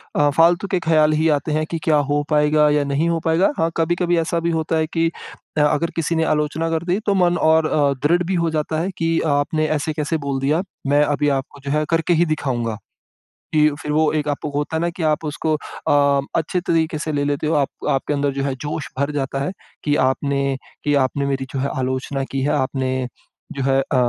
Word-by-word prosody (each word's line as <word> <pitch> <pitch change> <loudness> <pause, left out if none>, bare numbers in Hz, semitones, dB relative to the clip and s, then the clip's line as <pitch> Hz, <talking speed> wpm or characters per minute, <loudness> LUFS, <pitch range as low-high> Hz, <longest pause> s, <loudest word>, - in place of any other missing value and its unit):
अ, 145 0 +4
फ़ालतू 170 +5 +3
के 185 - +2
ख्याल 155 -2 +3
ही 155 +1 +2
आते 150 +1 0
हैं, 155 +1 0
कि 165 - -4
क्या 155 - +3 0.2
हो 145 0 +2
पाएगा 150 0 +4
या 150 0 +2
नहीं 140 +3 0
हो 165 -1 0
पाएगा? 165 +4 +3
हाँ, 165 - +1
कभी-कभी 175 +1 +1
ऐसा 165 +1 0
भी 170 0 -1
होता 160 0 -1
है 160 0 +1
कि 165 0 +2 0.5
अ, - - +4
अगर 150 +2 +2
किसी 165 0 -1
ने 160 - +2
आलोचना 155 +1 0
कर 165 0 -1
दी 185 +3 +2
तो 205 - +2
मन 175 -2 +3
और 160 0 +4
अ, 145 -2 +2
दृढ़ 175 +3 +3
भी 185 +2 -1
हो 165 - +1
जाता 155 0 -1
है 180 +4 -1
कि 165 -1 +1 0.2
आपने 155 +2 0
ऐसे 155 +2 -2
कैसे 150 +1 -1
बोल 135 -1 -1
दिया? 150 +5 +2 0.3
मैं 145 +1 +4
अभी 145 0 +1
आपको 135 +1 -11
जो 140 - -2
है 155 - 0
करके 165 +1 +2
ही 170 +1 +3
दिखाऊँगा। 125 -8 -2 0.8
कि 150 -1 +5
फिर 150 - -4
वो 155 +1 +3
एक 150 -1 -1
आपको 145 +1 -3
होता 145 +2 -2
है 160 - 0
ना 170 - +1
कि 170 0 -6
आप 155 0 +1
उसको 155 +1 -1
अ, 140 -2 +1
अच्छे 165 +3 0
तरीके 165 -2 0
से 155 - -3
ले 145 -1 0
लेते 145 +1 -1
हो, 160 - +1
आप 140 -2 +2 0.2
आपके 135 +2 0
अंदर 140 0 0
जो 135 0 -2
है 135 -1 -1
जोश 150 0 -4
भर 140 +1 0
जाता 135 -1 -2
है 145 - -2 0.3
कि 145 -1 +1
आपने 140 0 0 0.3
कि 145 - +1
आपने 140 +2 -2
मेरी 135 -1 -1
जो 135 - -2
है 140 +1 -1
आलोचना 130 +1 -2
की 135 - -1
है, 140 - +1
आपने 130 -1 -1 0.5
जो 135 - -3
है 135 0 +3
अ, 135 - -3
150 Hz, 230 wpm, -21 LUFS, 140-165 Hz, 0.8 s, कि